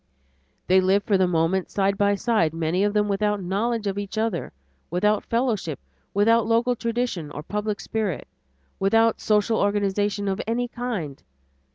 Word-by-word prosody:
They 185 +1 +4
live 195 +2 +2
for 205 - +1
the 185 -1 +3
moment 175 +2 +1
side 195 0 +1
by 205 0 +2
side, 200 -8 +1
many 165 +3 0
of 205 - +2
them 210 -1 +2
without 210 +1 0
knowledge 210 +5 -1
of 200 0 -1
each 205 +1 -6
other, 225 0 -1 0.4
without 210 +5 +1
fellowship, 225 - -1 0.3
without 225 +2 +3
local 235 +2 +2
tradition 230 -9 -2
or 145 +1 -7
public 210 +3 -3
spirit, 215 -6 -3 0.5
without 225 +3 +3
social 215 +1 +2
organization 205 0 0
of 195 +1 -1
any 240 +2 0
kind. 230 - -4
205 Hz, 155 wpm, -24 LUFS, 190-225 Hz, 0.5 s, They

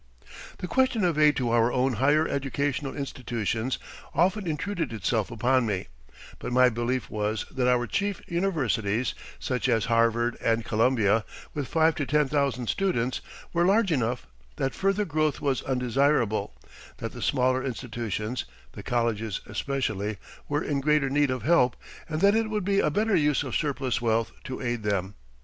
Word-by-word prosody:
The 180 - -5
question 260 -2 +2
of 170 -4 +2
aid 150 -1 +5
to 120 -3 0
our 120 +1 +3
own 130 +1 +1
higher 145 +7 +3
educational 140 0 -2
institutions 120 -3 -2 0.4
often 190 +3 +2
intruded 165 -1 -2
itself 110 -1 -1
upon 125 +2 +2
me, 95 -8 -2 0.5
but - - -5
my 125 0 +6
belief 120 +2 -2
was 105 0 -2
that 130 -2 0
our 125 -1 +3
chief 200 - -1
universities, 130 - 0 0.2
such 125 0 -1
as 115 -3 +2
Harvard 115 +1 +2
and 115 0 +1
Columbia, 110 -2 +2 0.3
with 145 -3 -3
five 160 0 +3
to 145 - -2
ten 150 -1 +3
thousand 140 -3 0
students, 130 - 0 0.3
were 170 0 +3
large 195 +1 +3
enough; 125 -4 0 0.3
that 135 - -1
further 195 +2 +1
growth 155 -2 0
was 140 -3 0
undesirable; 125 - +1 0.4
that - - -5
the - - -9
smaller 130 +1 +2
institutions 120 -2 -3 0.3
(the - - -9
colleges 115 -4 -1
especially) 110 -7 -2 0.3
were 145 +1 0
in 140 -2 -1
greater 150 -1 +2
need 145 0 +3
of 130 -1 -2
help 150 -7 +4 0.3
and 155 0 -2
that 200 +1 +6
it 225 0 +1
would 210 -3 -2
be 200 0 +2
a - - +3
better 215 0 +1
use 150 -2 +2
of 130 - -4
surplus 135 -5 -1
wealth 115 -4 +1
to 130 - -5
aid 120 -2 -1
them. 100 -2 -1
130 Hz, 165 wpm, -27 LUFS, 115-150 Hz, 0.5 s, my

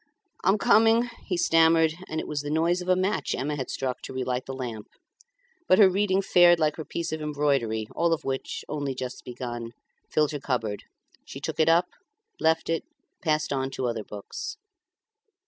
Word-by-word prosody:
"I'm 195 +3 +4
coming," 225 +4 +4 0.2
he 180 - -1
stammered; 165 -1 +4 0.2
and 160 - -2
it - - -5
was 150 -1 -2
the 145 - -5
noise 165 +4 +1
of 180 - -5
a 185 - +5
match 190 +3 0
Emma 150 +2 -2
had 130 -3 -4
struck 130 -2 -3
to - - -8
relight 130 -1 -2
the 135 - -4
lamp. 120 -5 -6 0.8
But 185 - +6
her 205 - +8
reading 195 0 +1
fared 175 -2 +6
like 155 -2 +1
her 160 - -5
piece 170 -1 -4
of 155 0 -3
embroidery, 140 -7 0
all 170 0 +2
of 165 - 0
which, 135 -1 -3
only 145 -3 -3
just 125 0 -6
begun, 120 -1 -6 0.4
filled 150 -1 +2
her 145 - -4
cupboard; 115 -7 -2 0.4
she - - -9
took - - -5
it 160 0 +4
up, 170 +2 +5 0.5
left 160 0 +2
it, 165 0 -1 0.4
passed 155 -2 0
on 135 -1 -1
to 130 -1 -4
other 115 -3 -2
books. 105 - -7
150 Hz, 185 wpm, -26 LUFS, 130-170 Hz, 0.8 s, her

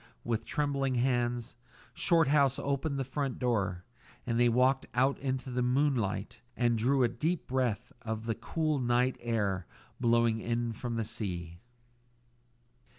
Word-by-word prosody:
With 115 -2 -1
trembling 140 -3 0
hands 120 -2 0 0.4
Shorthouse 145 -5 +3
opened 140 +1 -1
the 135 - 0
front 135 0 -3
door, 100 -8 -1 0.4
and 115 -1 0
they 120 0 +5
walked 130 +3 +3
out 130 +3 +2
into 130 -1 -3
the 125 0 0
moonlight 125 -6 0 0.2
and 120 -1 +3
drew 130 +4 +2
a - - +5
deep 150 +9 -2
breath 125 -3 -1
of 110 -1 -4
the 115 - 0
cool 155 +5 -1
night 125 +1 +2
air 100 -6 -1 0.3
blowing 115 -2 +3
in 120 0 -1
from 120 +1 -4
the 115 -1 -1
sea. 85 -6 -4
120 Hz, 140 wpm, -31 LUFS, 115-135 Hz, 0.4 s, they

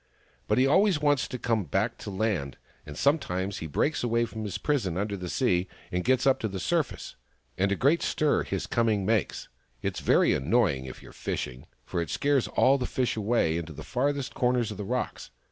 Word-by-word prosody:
But 105 - +2
he 130 - +5
always 185 +4 +4
wants 145 -3 +2
to 125 - -5
come 115 -3 0
back 75 - -1
to - - -7
land, 95 - -1 0.3
and 75 0 -8
some 145 +3 +3
times 95 -3 -3
he 80 - -5
breaks 145 - 0
away 120 0 +2
from 110 -1 -7
his 100 - -3
prison 115 - -1
under 100 +1 -1
the 90 -2 -6
sea 95 -8 +1 0.2
and 90 0 -1
gets 130 +1 +2
up 135 -1 +4
to 110 - -1
the 95 -2 -5
surface 85 - -2 0.2
— - - -42
and 100 +1 +2
a - - +2
great 145 +9 +3
stir 150 -1 +1
his - - -3
coming 110 -5 +1
makes: 110 0 0 0.4
it's - - -2
very - - +4
annoying 75 - +1
if 65 - -9
you're - - -12
fishing, 65 0 -5 0.2
for 85 - -2
it 85 - -4
scares 140 -3 +1
all 135 +2 +3
the 125 - -2
fish 125 -2 -1
away 105 -7 +1
into 85 -1 -5
the - - -9
farthest 140 +1 -1
corners 125 -3 +1
of 105 - -7
the 105 - -5
rocks. 125 +4 -3
110 Hz, 215 wpm, -28 LUFS, 90-130 Hz, 0.4 s, he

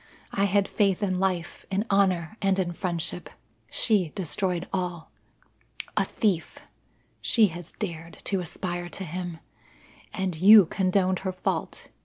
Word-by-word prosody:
I 200 - +1
had 200 0 +2
faith 200 -1 +1
in 185 -2 0
life, 185 -3 -2
in 195 +3 0
honour, 185 -3 +2
and 195 -1 +2
in 180 -2 0
friendship. 175 -2 -3 0.4
She 200 -8 +2
destroyed 180 0 -1
all. 180 -3 -3 0.8
A - - +2
thief 195 -7 -1 0.6
she 220 -4 +4
has 175 0 -9
dared 165 -4 -6
to 195 - 0
aspire 175 0 -4
to 190 - -5
him! 175 0 -5 0.7
And 190 -3 -2
you 205 0 +9
condoned 185 +1 +1
her 190 -1 -2
fault. 185 - -3
185 Hz, 135 wpm, -26 LUFS, 175-195 Hz, 0.8 s, you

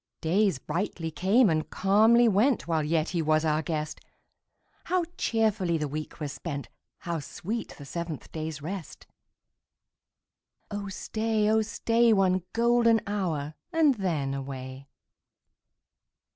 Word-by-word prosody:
Days 190 0 +2
brightly 165 +3 -3
came 195 +10 +4
and 155 -3 0
calmly 220 +5 +4
went, 220 +2 +2
While 160 -2 +1
yet 155 +1 0
he 175 -2 -1
was 155 0 +2
our 155 0 +2
guest; 155 -1 -4 0.8
How 365 -1 +1
cheerfully 215 -7 +1
the 150 -1 -2
week 155 +3 -6
was 145 -3 -4
spent! 145 -5 -5 0.3
How 170 -2 -3
sweet 210 +10 -5
the 145 - -10
seventh 165 0 -6
day's 155 -2 -5
rest! 165 -3 -6 1.7
Oh 205 -1 -4
stay, 220 +2 -1
oh 220 0 +4
stay. 230 +1 +2
One 190 -2 +3
golden 235 -1 +3
hour, 165 -8 -2 0.2
and 320 -4 +4
then 165 - -1
away. 135 0 -6
175 Hz, 125 wpm, -28 LUFS, 155-220 Hz, 1.7 s, came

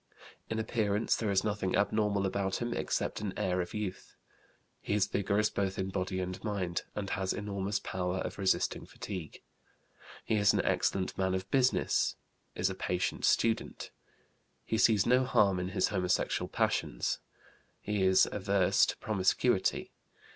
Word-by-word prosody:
In 110 - -2
appearance 110 -1 +1
there 110 - -2
is 95 -1 +2
nothing 105 -3 -1
abnormal 105 -1 +1
about 95 0 -1
him 120 0 -2
except - - -2
an 100 -3 -4
air 90 0 0
of 90 - -6
youth. 100 -3 -5 0.7
He 100 - -1
is 105 -2 +3
vigorous 100 +2 0
both 95 -1 -1
in 95 0 -2
body 95 0 -2
and 90 0 -4
mind, 95 -5 -2
and 100 -2 -3
has 95 0 -1
enormous 100 -1 -2
power 90 0 -2
of 95 - -4
resisting 95 -1 0
fatigue. 90 -7 -7 0.8
He 110 - +1
is 100 -1 +4
an - - +1
excellent 95 -1 0
man 95 0 +1
of 95 +1 -5
business. 130 -1 +2 0.4
Is 90 - +1
a 95 - -2
patient 90 -1 -1
student. 115 -1 +1 0.7
He 110 - -1
sees 105 -4 +4
no 125 +1 +4
harm 100 -7 +3
in 90 - -2
his - - +1
homosexual 90 -3 0
passions. - - 0 0.6
He 105 -1 -2
is 95 0 +5
averse 100 -2 +3
to - - -3
promiscuity. 100 +1 +1
100 Hz, 155 wpm, -31 LUFS, 95-105 Hz, 0.8 s, is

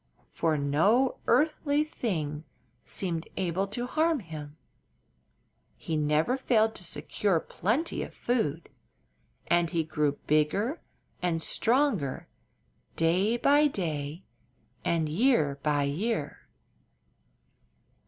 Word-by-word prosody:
For 160 -2 0
no 180 - +2
earthly 295 +2 +2
thing 155 - -3 0.4
seemed 170 -4 -3
able 190 +1 0
to 240 +5 -3
harm 315 +4 +1
him; 155 -6 -9 1.2
he 160 - -3
never 150 - +1
failed 220 -4 +2
to - - -6
secure 180 +1 0
plenty 235 - -1
of - - -5
food, 170 - -1 0.8
and 175 -1 +2
he 165 -2 0
grew 150 -2 0
bigger 195 - +1 0.4
and 175 -2 0
stronger 225 - +1 0.7
day 185 +8 +2
by 290 +4 +4
day 160 - -3 0.6
and 165 -2 +1
year 155 - +2
by 145 -1 +1
year. 150 +3 -2
175 Hz, 100 wpm, -28 LUFS, 155-240 Hz, 1.2 s, by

